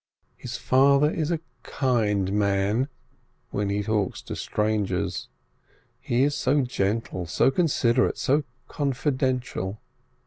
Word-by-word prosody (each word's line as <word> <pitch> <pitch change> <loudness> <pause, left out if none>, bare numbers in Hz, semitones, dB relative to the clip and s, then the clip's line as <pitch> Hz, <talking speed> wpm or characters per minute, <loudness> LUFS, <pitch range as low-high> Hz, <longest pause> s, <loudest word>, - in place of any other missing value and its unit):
His 120 -1 -6
father 140 +3 +4
is 155 -2 -2
a 170 -2 0 0.2
kind 105 -9 0
man 100 +4 +1 0.6
when 100 -1 -1
he 100 +1 0
talks 105 -3 -1
to - - -6
strangers, 105 -4 -1 0.7
he 125 -1 +1
is 145 +1 +2
so 140 +1 +2
gentle, 100 -6 -2
so 90 - +3
considerate, 135 -6 +2
so 145 +3 +2 0.2
confidential. 130 - -1
120 Hz, 110 wpm, -25 LUFS, 105-135 Hz, 0.7 s, father